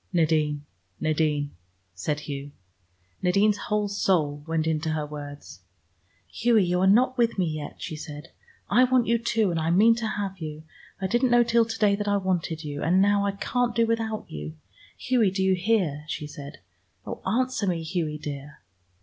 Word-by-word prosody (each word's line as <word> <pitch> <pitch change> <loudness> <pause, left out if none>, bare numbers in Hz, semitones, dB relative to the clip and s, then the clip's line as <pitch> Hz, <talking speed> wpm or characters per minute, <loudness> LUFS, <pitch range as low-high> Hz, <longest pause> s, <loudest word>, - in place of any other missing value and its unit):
"Nadine, 155 -4 +1 0.3
Nadine," 150 -2 0 0.4
said 145 +12 -2
Hugh. 140 -1 -6 0.7
Nadine's 200 +3 +3
whole 210 -1 +1
soul 160 -8 0
went 160 -1 0
into 160 0 0
her 155 -1 -2
words. 145 -8 -9 0.7
"Hughie, 230 -3 +2
you 180 0 +1
are 190 - +4
not 250 +5 +4
with 235 -2 +2
me 185 - +2
yet," 155 -2 -4
she 155 - -5
said. 150 -1 -8 0.4
"I 255 - +5
want 255 -1 +3
you, 235 +1 +2
too, 225 -4 +1
and 165 - -1
I 160 +1 0
mean 210 +7 +6
to 230 -1 -2
have 200 -3 -3
you. 155 -1 -6 0.4
I 190 - -2
didn't 240 +6 +2
know 240 0 +5
till 235 0 +3
to 225 0 -5
day 205 -2 +3
that 205 0 -4
I 205 0 +3
wanted 175 -4 -1
you, 145 -1 -5
and 180 +3 +3
now 200 0 +3
I 200 - -1
can't 240 +4 -1
do 230 -1 +4
without 225 -1 -1
you. 75 +1 -7 0.4
Hughie, 245 -5 +2
do 190 0 -1
you 190 0 +4
hear?" 180 -6 0
she 155 - -4
said. 145 -3 -10 0.4
"Oh, - - -6
answer 250 +1 0
me, 170 -3 -1
Hughie 160 -2 -2
dear!" 145 -1 -7
185 Hz, 185 wpm, -26 LUFS, 150-220 Hz, 0.7 s, mean